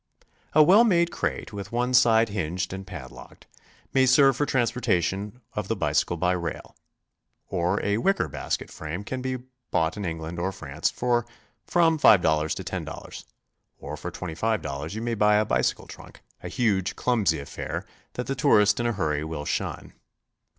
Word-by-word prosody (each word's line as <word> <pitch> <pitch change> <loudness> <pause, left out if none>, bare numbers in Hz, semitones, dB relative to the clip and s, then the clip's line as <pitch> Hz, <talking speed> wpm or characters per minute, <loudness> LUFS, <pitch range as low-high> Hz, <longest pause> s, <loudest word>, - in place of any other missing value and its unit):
A 155 - +7
well 195 +8 +7
made 170 -6 +3
crate, - - -3
with 100 -1 -7
one 125 +2 0
side 115 -2 +5
hinged 90 -2 -3
and 95 0 -7
padlocked, 65 -5 -11 0.5
may 130 -1 +4
serve 135 +1 +6
for 145 - 0
transportation 110 -3 0
of 105 -3 -3
the 115 - 0
bicycle 75 -2 0
by 90 +2 +1
rail. 85 -2 -4 0.7
Or 90 +3 0
a 105 +1 +1
wicker 195 +9 +1
basket - - -4
frame 80 +6 -6
can 130 +4 -4
be 130 0 -2 0.3
bought 80 +1 0
in 105 - -4
England 80 -1 -4
or 95 +2 -1
France 75 -4 -2
for 120 -1 0 0.4
from 165 -2 +3
$5 80 - +4
to - - -6
$10. - - -6 0.5
Or 75 +2 -7
for 75 +4 -6
$25 85 -3 -3
you 110 - -4
may 120 0 -1
buy 105 -1 +4
a 105 +1 +3
bicycle - - 0
trunk, - - -13 0.2
a - - -6
huge, 95 -3 0
clumsy 110 -10 +1
affair 70 +1 -5 0.3
that 125 - -4
the 135 - -2
tourist 105 -5 +4
in 120 - 0
a 120 - 0
hurry 75 -6 -1
will 80 -2 -5
shun. - - -3
105 Hz, 165 wpm, -26 LUFS, 85-120 Hz, 0.7 s, A